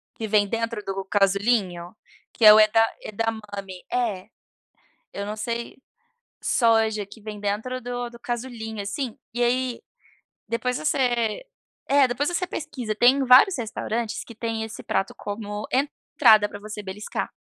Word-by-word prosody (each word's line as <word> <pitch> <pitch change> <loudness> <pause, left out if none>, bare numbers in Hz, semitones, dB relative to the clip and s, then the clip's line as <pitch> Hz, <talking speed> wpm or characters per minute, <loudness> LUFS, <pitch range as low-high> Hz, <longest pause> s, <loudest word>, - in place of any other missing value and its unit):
que 220 - -4
vem 205 -1 +3
dentro 230 0 -3
do 195 0 -4
casulinho, 195 -2 +1 0.4
que 225 - +2
é 210 - +12
o 215 - +7
eda 220 +1 +5 0.2
edamame, 205 -4 -5
é, 220 -7 -1 0.9
eu 200 - -4
não 210 +1 -4
sei, 235 +2 -4 0.6
soja 225 -3 +2
que 205 +2 -15
vem 210 -1 -7
dentro 210 +5 -2
do 245 0 -4
do 235 - -13
casulinho, 235 -3 -5
assim. 220 +4 -4 0.2
E 240 +1 0
aí, 250 0 0 0.7
depois 245 +2 -1
você 245 - 0 0.4
é, 280 -1 +5
depois 250 +4 -1
você 350 +1 -1
pesquisa. 250 -10 -4
Tem 255 +5 +4
vários 265 +9 +7
restaurantes 225 0 -3
que 230 - -12
têm 225 0 -3
esse 220 -1 -8
prato 195 - -1
como 205 0 -5
entrada 255 -5 +3
pra 205 - -9
você 210 0 -7
beliscar. 205 +2 -5
225 Hz, 145 wpm, -24 LUFS, 210-245 Hz, 0.9 s, é